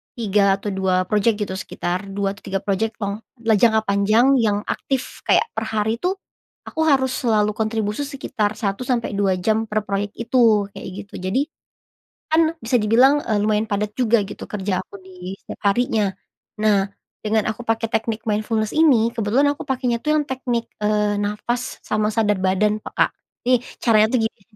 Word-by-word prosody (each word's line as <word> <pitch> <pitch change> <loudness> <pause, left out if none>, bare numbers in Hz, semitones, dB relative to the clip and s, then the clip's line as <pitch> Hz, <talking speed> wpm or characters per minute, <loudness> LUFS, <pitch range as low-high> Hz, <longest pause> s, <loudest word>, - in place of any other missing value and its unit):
3 200 -3 +2
atau 210 - -3
2 190 -1 +1
project 210 +1 +2
gitu, 190 - -5
sekitar 180 +1 -3
2 195 0 0
atau - - -18
3 195 0 -2
project 205 +3 -1
long 200 0 -2 0.2
la 225 -2 +3
jangka 220 0 +4
panjang 215 +6 +3
yang 210 -3 +1
aktif 265 -2 -3
kayak 465 - +3
per 225 - -1
hari 220 +1 -1
tuh, 360 +9 0 0.6
aku 320 - -3
harus 270 -4 +3
selalu 215 -4 +2
kontribusi 220 +3 -1
sekitar 220 -7 -2
1 205 +2 -3
sampai 235 -5 -1
2 195 -2 +2
jam 220 +3 +1
per 215 0 0
proyek 200 +1 -2
itu, 225 -4 +3
kayak - - -9 0.2
gitu. 205 - -27
Jadi, 190 +8 0 0.9
kan 320 0 +3
bisa 230 +3 0
dibilang, 255 +7 +5
eee, 215 -2 0
lumayan 215 +1 +1
padat 210 0 -1
juga 235 -3 +3
gitu, 195 - -8
kerja 195 -2 -2
aku 190 - -15
di 185 0 -8
setiap - - -10
harinya. 215 -2 +1 0.5
Nah, 200 -2 +3 0.4
dengan 215 0 +1
aku 220 - -8
pakai 225 0 +1
teknik 220 -1 -1
mindfulness 215 0 0
ini, 260 -8 +4
kebetulan 240 +7 +2
aku 290 - -10
pakainya 250 -3 0
tuh 305 0 +2
yang 300 - +1
teknik, 245 -3 -2 0.2
eee, 210 0 +2
nafas 210 +4 -2
sama 215 0 0
sadar 210 -3 +2
badan 205 +3 +2
peka. - - +1 0.4
Nih 250 -2 +4 0.2
caranya 215 -2 +5
tuh - - +3
gini 220 -1 -6
215 Hz, 175 wpm, -21 LUFS, 205-235 Hz, 0.9 s, dibilang